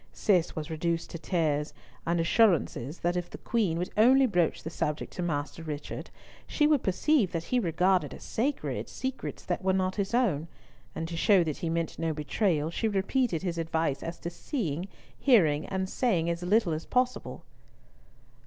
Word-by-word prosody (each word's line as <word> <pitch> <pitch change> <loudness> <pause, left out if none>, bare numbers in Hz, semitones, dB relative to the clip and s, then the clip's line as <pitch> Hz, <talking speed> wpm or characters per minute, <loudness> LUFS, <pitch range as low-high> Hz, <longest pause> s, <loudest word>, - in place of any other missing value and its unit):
Cis 180 -6 +2
was 155 0 -5
reduced 165 +1 -2
to 170 - -6
tears, 155 -4 0 0.3
and 170 0 +1
assurances 165 - +2
that 175 +1 +1
if 175 -1 -2
the - - -8
Queen 205 -9 0
would 180 +2 -3
only 260 +5 +6
broach 175 -8 +1
the 160 - -5
subject 150 -1 -3
to - - -4
Master 155 -1 -2
Richard, 150 -2 -6 0.4
she 295 - +2
would 300 -3 +4
perceive 205 - +2
that 165 -1 -2
he 250 +8 +1
regarded 180 -1 +2
as - - -10
sacred, 275 +6 -2
secrets 260 0 -5
that 180 +1 -2
were 190 0 +2
not 185 +1 0
his 200 +3 0
own; 175 - +1 0.5
and 160 - -3
to 170 - -5
show 185 +2 +4
that 155 -3 -3
he 165 - -3
meant 165 0 -2
no 165 -1 0
betrayal, 155 +1 0
she 220 - -1
repeated 200 -1 0
his 170 -3 -2
advice 160 -3 -1
as 165 +1 -5
to 170 - -4
seeing, 175 - -3 0.3
hearing, 165 - +4
and 190 -1 -2
saying 185 -7 +1
as 170 +1 -4
little 185 -1 +2
as 155 +1 -5
possible. 250 0 -1
175 Hz, 180 wpm, -29 LUFS, 160-210 Hz, 0.5 s, only